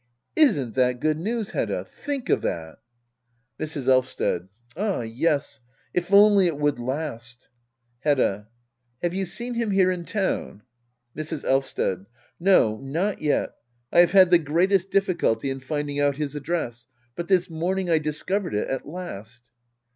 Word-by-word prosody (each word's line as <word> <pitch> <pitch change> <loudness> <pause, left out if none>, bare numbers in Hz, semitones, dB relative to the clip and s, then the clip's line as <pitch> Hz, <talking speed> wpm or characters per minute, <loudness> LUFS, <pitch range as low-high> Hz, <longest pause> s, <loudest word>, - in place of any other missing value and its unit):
Isn't 145 - +3
that 125 -1 +2
good 155 +2 0
news/Hedda? 220 +3 -2
Think 280 -4 -5
of - - +3
that 80 -1 -4 0.8
I - - -2
Mrs. 150 -4 -3
Elvsted. 130 -8 +1 0.3
Ah 200 - -1
yes^ 140 +5 -1 0.3
if 180 +2 -1
only 200 -2 +7
it 160 -4 -2
would 145 -3 0
last! 125 -2 -5 0.5
Hedda. 120 -9 +1 0.6
Have 175 0 0
you 190 0 -1
seen 235 +7 -3
him 235 -2 -1
here 190 -2 +3
in 175 -2 -4
town? 190 - -2 0.5
Mrs. 155 0 -4
Elvsted. 130 -8 0 0.3
No^ 140 - +4
not 165 +10 -2
yet. 150 -1 +1 0.4
I - - +4
have 175 +1 +6
had 185 -2 +7
the 175 - +7
greatest 180 +5 +1
difficulty 170 - +1
in 135 - -4
finding 145 +1 -3
out 145 -1 +2
his 150 -2 -3
address. 135 -6 -3 0.3
But 170 - -4
this 185 -2 +3
morning 175 +2 -2
I 160 - +4
discovered 155 - -2
it 105 - -1
at 135 -1 -3
last. 120 - -9
155 Hz, 145 wpm, -24 LUFS, 130-185 Hz, 0.8 s, only